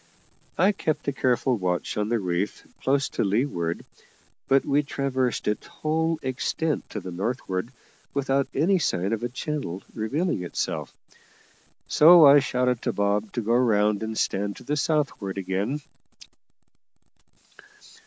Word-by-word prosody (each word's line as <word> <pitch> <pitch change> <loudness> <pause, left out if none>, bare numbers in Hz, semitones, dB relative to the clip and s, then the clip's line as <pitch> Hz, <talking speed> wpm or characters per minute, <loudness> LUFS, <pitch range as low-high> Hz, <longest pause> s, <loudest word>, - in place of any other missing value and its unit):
I 190 +4 +4
kept 160 -8 -2
a - - 0
careful 130 -1 +1
watch 90 -2 -2
on 105 0 -1
the 120 - +2
reef 95 0 -2 0.2
close 135 +1 +1
to - - -1
leeward, 100 -6 -1 0.6
but 135 0 +3
we 145 +1 +3
traversed 130 -4 -2
its 105 - -1
whole 160 +1 -1
extent 145 +4 -2
to 105 - -5
the 90 -1 -7
northward 95 +1 -3 0.4
without 140 0 0
any 180 +7 +2
sign 95 - 0
of 115 - -2
a 120 - -2
channel 125 - -4
revealing 140 - -1
itself, 90 - -3 1.0
so 165 +1 +8
I 140 +1 +9
shouted 125 -2 0
to - - -1
Bob 100 +1 0
to 120 - -1
go 115 +2 0
round 105 -4 +3
and 110 0 -4
stand 100 +1 -1
to - - -12
the 150 - -1
southward 145 - -1
again. 100 +9 -2
125 Hz, 140 wpm, -25 LUFS, 100-140 Hz, 1.0 s, I